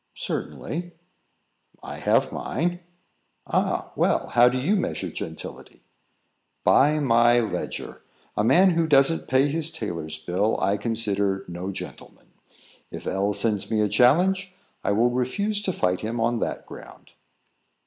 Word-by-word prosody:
"Certainly." 175 +2 -4 0.9
"I - - -7
have - - +2
mine." 175 +1 -2 0.7
"Ah! - - -1
Well, - - +1
how 120 +1 +5
do 125 - -2
you 155 +12 +1
measure 190 - -2
gentility?" - - -8 0.8
"By 150 +3 +4
my 120 -3 +4
ledger. 110 -3 -4 0.3
A 105 - +1
man 185 - +5
who 165 -1 +1
doesn't 145 +2 +3
pay 130 +2 +3
his 160 +2 0
tailor's 85 - -5
bill, 90 +7 -1
I 100 - +1
consider 100 -3 -1
no 90 +2 -5
gentleman. - - -10 0.6
If - - -9
L 100 +2 0
sends 105 -1 0
me 110 -1 0
a 105 - +2
challenge, 180 - +3 0.3
I - - +1
will 115 +4 +3
refuse 200 - -1
to 200 - -1
fight 90 - 0
him 115 +2 -3
on 115 +1 +1
that - - -3
ground." - - -13
120 Hz, 140 wpm, -24 LUFS, 100-160 Hz, 0.9 s, how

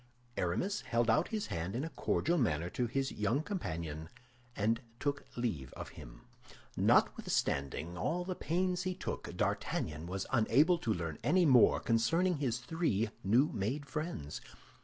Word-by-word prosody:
Aramis 180 - -1
held 115 -1 +1
out 155 +9 +3
his 215 -2 -2
hand 85 +4 -3
in 130 - -1
a 165 - -3
cordial 170 0 +1
manner 85 - 0
to 125 - 0
his 135 +3 -1
young 110 +8 0
companion, 80 - -4 0.5
and 115 +4 +1 0.2
took 140 0 -1
leave 90 - -2
of - - -7
him. - - -12 0.5
Notwithstanding 70 +5 +1
all 170 - -1
the 185 - -2
pains 180 +2 0
he 185 -1 -2
took, - - -5
D'Artagnan 75 +2 -1
was 95 +2 -3
unable 135 +8 +4
to 115 - -1
learn 80 -6 -3
any 180 -1 +4
more 130 -6 +6
concerning 160 +11 +2
his 130 -5 0
three 120 - 0
new 120 +10 +4
made 125 +9 -2
friends. 150 - -4
120 Hz, 150 wpm, -33 LUFS, -, 0.5 s, more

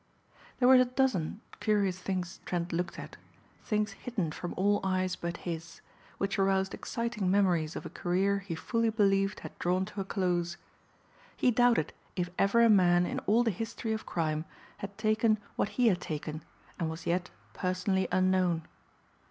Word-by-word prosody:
There 250 - +4
were 260 - +8
a - - +4
dozen 245 - 0 0.2
curious 200 -4 +1
things 185 -1 -3
Trent 175 -1 -2
looked 180 +2 -2
at, - - -8 0.5
things 210 -1 0
hidden 195 -6 -3
from 175 +3 -5
all 205 +2 +3
eyes 185 -1 0
but 170 0 -4
his, 170 -1 -5 0.4
which 195 0 -1
aroused 190 0 +2
exciting 230 -5 -2
memories 180 -5 +2
of - - -6
a - - -5
career 195 +2 +1
he 195 -4 -5
fully 230 +7 0
believed 195 -2 +2
had - - -10
drawn 180 +2 +1
to 205 0 -5
a - - -1
close. 175 -3 -1 0.8
He 250 - +3
doubted 240 -9 +3 0.2
if 175 -1 -2
ever 200 +4 +4
a - - +7
man 180 -4 +5
in - - -2
all 225 +4 +4
the 230 - +2
history 225 +3 -3
of 220 - -5
crime 155 -2 -1 0.3
had 200 0 -7
taken 215 0 +2 0.2
what - - 0
he 250 - +4
had 180 -3 0
taken 155 -1 -4 0.4
and 165 -2 0
was 160 +1 -7
yet 175 +1 0 0.2
personally 185 0 0
unknown. 185 -3 +2
190 Hz, 170 wpm, -30 LUFS, 175-215 Hz, 0.8 s, were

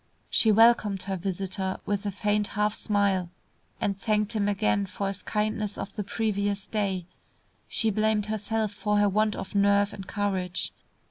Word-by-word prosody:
She 220 - +5
welcomed 215 -3 +4
her 195 0 -2
visitor 190 +1 -3
with 205 0 -1
a - - +1
faint 205 +1 0
half 210 0 +2
smile, 200 -5 +1 0.5
and 200 - 0
thanked 210 +1 0
him 205 -2 +1
again 105 - +1
for 200 - -4
his 195 -1 -3
kindness 210 -1 -1
of 195 - -6
the 210 - -2
previous 205 -1 -1
day. 195 -5 -1 0.6
She 225 -1 +1
blamed 215 0 +1
herself 215 0 -1
for 210 0 0
her 205 0 +4
want 210 +2 +2
of 190 - -6
nerve 200 0 +3
and 195 -2 -8
courage. 190 -3 -2
205 Hz, 160 wpm, -27 LUFS, 195-210 Hz, 0.6 s, She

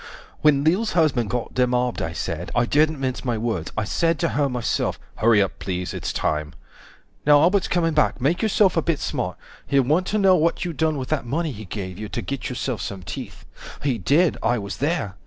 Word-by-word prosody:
When 145 -2 +4
Lil's 190 +8 +2
husband 145 - +2
got 125 -1 -3
demobbed, 125 -1 +1
I 80 - -2
said, 85 +1 -4
I 120 0 +3
didn't 155 +3 +2
mince 130 -2 -2
my 120 -3 -1
words, 110 -8 -2
I 110 - +1
said 165 +9 +1
to - - 0
her 140 +5 +1
myself, 125 -2 -1 0.2
140 110 - +2
HURRY 110 -3 +6
UP 100 - -5
PLEASE 90 -1 -3
ITS - - -3
TIME 75 0 -2 0.7
Now 145 0 +6
Albert's 185 +5 +3
coming 165 -2 +1
back, 150 -2 +2
make 145 +7 +1
yourself 210 -4 +3
a 165 - +3
bit 165 -1 0
smart. - - -3 0.3
He'll 140 -1 +3
want 160 +8 +1
to 215 - 0
know 195 -2 +5
what 170 +1 +1
you 175 - -3
done 155 0 0
with 130 -2 -5
that 150 -6 -1
money 155 +5 -1
he 110 -3 -8
gave 95 -1 -6
you 105 -1 -5
To 120 - -4
get 140 -1 -4
yourself 120 -1 -3
some 95 -2 -5
teeth. 75 - -8 0.4
He 130 -5 0
did, 155 - +3
I 120 +1 +2
was 100 -2 -5
there. 140 - -1
135 Hz, 215 wpm, -23 LUFS, 110-160 Hz, 0.7 s, HURRY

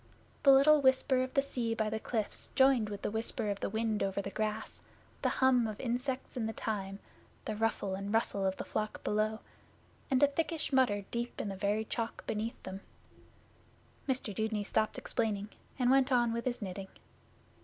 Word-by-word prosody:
The 275 - +7
little 285 +2 +7
whisper 260 0 +4
of 255 0 -3
the 275 - +4
sea 235 -4 -1
by 220 -2 0
the 220 - -1
cliffs 220 -2 -3
joined 265 -5 +5
with 205 -1 -6
the - - -1
whisper 220 0 -1
of 200 - -4
the - - -2
wind 220 0 -1
over 195 0 0
the 195 0 -4
grass, 215 +1 -3 0.4
the - - +2
hum 255 -3 +3
of 215 -1 -6
insects 255 +2 -2
in 230 -3 -1
the 220 - -3
thyme, 195 -4 -3 0.5
the 215 - -2
ruffle 215 -3 0
and 200 +1 -4
rustle 225 -3 +1
of 190 0 0
the - - -5
flock 215 0 -3
below, 215 +1 0 0.7
and 260 +1 +3
a - - +8
thickish 320 +1 -2
mutter 205 -7 +3
deep 240 0 -3
in 205 - -2
the 195 - -4
very 205 +3 0
chalk 230 +1 -4
beneath 220 +2 -3
them. 190 +1 -6 1.3
Mr 255 -5 -1
Dudeney 220 0 -1
stopped 215 +1 0
explaining, 210 -2 -1 0.3
and 250 -1 +3
went 270 0 +4
on 240 -2 +3
with 235 0 -3
his 245 -3 -2
knitting. 190 0 -5
225 Hz, 185 wpm, -32 LUFS, 210-255 Hz, 1.3 s, a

